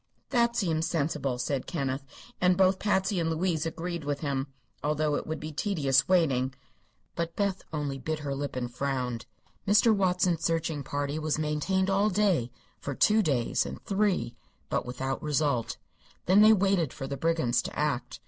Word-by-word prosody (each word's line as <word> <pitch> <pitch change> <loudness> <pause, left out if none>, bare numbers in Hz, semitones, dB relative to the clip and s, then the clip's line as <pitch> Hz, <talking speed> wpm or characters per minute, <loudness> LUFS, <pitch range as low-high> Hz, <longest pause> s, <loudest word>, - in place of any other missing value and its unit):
"That 235 -2 +2
seems 165 -7 0
sensible," 140 -5 -1
said 130 +2 -2
Kenneth, 135 -5 -2 0.4
and 180 0 +4
both 190 0 +4
Patsy 195 -2 +1
and 165 -1 0
Louise 165 -1 0
agreed 170 0 -4
with 145 -1 -2
him, 140 -2 -1 0.4
although 150 0 +1
it - - -2
would 160 - -3
be 155 0 -6
tedious 145 -6 +1
waiting. 135 -8 +2 0.6
But 170 0 -3
Beth 200 -2 0
only 145 -3 -3
bit 155 +4 -2
her 145 -2 -4
lip 140 0 -4
and 120 -1 -3
frowned. 125 -3 -2 0.4
Mr. 215 +2 +5
Watson's 180 -3 +1
searching 165 -2 0
party 145 +2 -2
was 155 -1 0
maintained 155 +6 0
all 200 +2 +3
day 185 - +2 0.3
for 140 - -5
two 215 +9 +4
days, 135 - +1
and - - -7
three; 195 - 0 0.3
but - - -1
without 130 +2 -3
result. 145 -5 0 0.5
Then 190 +4 +6
they 215 +1 +8
waited 190 -7 +2
for 135 - -6
the 140 +1 -4
brigands 160 -6 +1
to - - -6
act. 150 -4 -1
155 Hz, 165 wpm, -28 LUFS, 140-185 Hz, 0.6 s, they